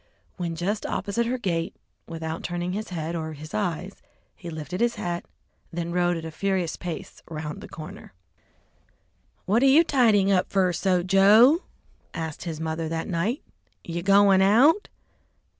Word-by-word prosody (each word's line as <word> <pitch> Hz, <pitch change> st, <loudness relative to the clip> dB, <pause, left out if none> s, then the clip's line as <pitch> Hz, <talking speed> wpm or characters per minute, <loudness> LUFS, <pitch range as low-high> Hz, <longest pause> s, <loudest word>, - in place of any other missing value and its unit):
When 170 Hz, -2 st, -3 dB
just 195 Hz, +6 st, -2 dB
opposite 230 Hz, +4 st, -1 dB
her 255 Hz, +2 st, -1 dB
gate, 170 Hz, -8 st, -2 dB, 0.3 s
without 160 Hz, -1 st, -5 dB
turning 175 Hz, 0 st, -3 dB
his 215 Hz, +2 st, -4 dB
head 165 Hz, -1 st, -4 dB
or 160 Hz, -1 st, -4 dB
his 155 Hz, +1 st, -10 dB
eyes, 185 Hz, -1 st, -3 dB, 0.3 s
he 175 Hz, -, -9 dB
lifted 160 Hz, +4 st, -5 dB
his 240 Hz, 0 st, +2 dB
hat, 175 Hz, 0 st, -4 dB, 0.5 s
then 170 Hz, 0 st, -4 dB
rode 175 Hz, 0 st, +1 dB
at 165 Hz, -, -7 dB
a 160 Hz, -, -5 dB
furious 185 Hz, 0 st, -1 dB
pace 175 Hz, -2 st, -7 dB
around 155 Hz, -2 st, -6 dB
the -, -, -9 dB
corner. 155 Hz, -1 st, -10 dB, 1.3 s
"What 215 Hz, +5 st, +2 dB
you 275 Hz, +4 st, +6 dB
tidying 220 Hz, -, +3 dB
up 185 Hz, -2 st, +1 dB
so 190 Hz, -2 st, +3 dB
fer, 180 Hz, +1 st, +1 dB
Joe?" 210 Hz, -, +6 dB, 0.5 s
asked 160 Hz, -1 st, -5 dB
his 160 Hz, -3 st, -4 dB
mother 160 Hz, 0 st, -3 dB
that 165 Hz, 0 st, -3 dB
night; 190 Hz, -, -1 dB, 0.4 s
"you 170 Hz, 0 st, -4 dB
goin' 195 Hz, 0 st, +5 dB
out?" 255 Hz, -, +4 dB
180 Hz, 155 wpm, -25 LUFS, 165-200 Hz, 1.3 s, you